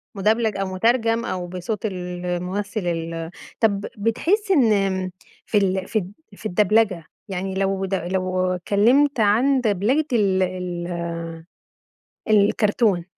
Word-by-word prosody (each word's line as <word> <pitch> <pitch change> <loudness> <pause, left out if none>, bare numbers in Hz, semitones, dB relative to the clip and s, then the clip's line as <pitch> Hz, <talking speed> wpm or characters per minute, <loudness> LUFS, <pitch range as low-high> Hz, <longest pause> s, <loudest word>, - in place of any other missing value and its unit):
مدبلج 215 +2 +1
أو 195 0 -1
مترجم 230 +3 +2
أو 180 -1 -3
بصوت 185 +4 -4
الممثّل 180 +2 -3
ال 165 -1 -3 0.3
طب 205 -3 +1
بتحس 350 - +1
إن 255 - +5
آمم 190 -2 0 0.3
في 215 - +1
ال 190 -1 +1
في 220 - +1
ال 185 0 -7 0.3
في - - -14
الدبلجة 205 -3 +2 0.2
يعني 190 0 -3
لو 195 0 0
د 195 - -5
لو 185 0 -1
اتكلّمت 240 +10 +3
عن 245 +6 +3
دبلجة 225 +8 +1
ال 195 -4 +3
ال 180 -1 -4 1.4
الكرتون 205 -2 +3
195 Hz, 125 wpm, -22 LUFS, 185-220 Hz, 1.4 s, إن